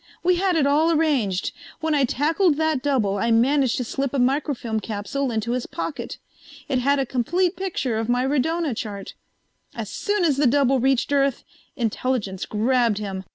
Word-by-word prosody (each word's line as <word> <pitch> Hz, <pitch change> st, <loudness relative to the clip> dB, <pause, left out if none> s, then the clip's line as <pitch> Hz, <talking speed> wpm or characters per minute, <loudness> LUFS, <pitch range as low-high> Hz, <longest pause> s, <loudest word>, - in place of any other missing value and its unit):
"We 360 Hz, 0 st, +3 dB
had 375 Hz, -1 st, +1 dB
it 305 Hz, -4 st, +3 dB
all 305 Hz, +4 st, +3 dB
arranged. 275 Hz, -, +1 dB, 0.3 s
When 320 Hz, -1 st, 0 dB
I 280 Hz, -2 st, +3 dB
tackled 310 Hz, +6 st, +2 dB
that 315 Hz, -4 st, +1 dB
double 225 Hz, -9 st, 0 dB
I 230 Hz, -, 0 dB
managed 255 Hz, +3 st, +3 dB
to 250 Hz, -, -1 dB
slip 275 Hz, +3 st, -3 dB
a -, -, +1 dB
microfilm 250 Hz, -3 st, 0 dB
capsule 225 Hz, +6 st, -3 dB
into 225 Hz, 0 st, -2 dB
his 250 Hz, 0 st, -2 dB
pocket. -, -, -5 dB, 0.5 s
It 265 Hz, -3 st, 0 dB
had 280 Hz, +3 st, +2 dB
a 270 Hz, -, 0 dB
complete 340 Hz, -, 0 dB
picture 340 Hz, -11 st, -2 dB
of 225 Hz, +1 st, -3 dB
my 245 Hz, +1 st, +2 dB
radona 295 Hz, +1 st, 0 dB
chart. 205 Hz, -3 st, -6 dB, 0.6 s
As -, -, -5 dB
soon 410 Hz, -3 st, 0 dB
as 290 Hz, -5 st, +2 dB
the 285 Hz, -1 st, +3 dB
double 270 Hz, 0 st, +3 dB
reached 265 Hz, +1 st, +1 dB
Earth, 275 Hz, -2 st, +1 dB, 0.3 s
Intelligence 225 Hz, -4 st, -2 dB
grabbed 230 Hz, 0 st, +1 dB
him. 195 Hz, -2 st, -5 dB
265 Hz, 175 wpm, -23 LUFS, 230-295 Hz, 0.6 s, We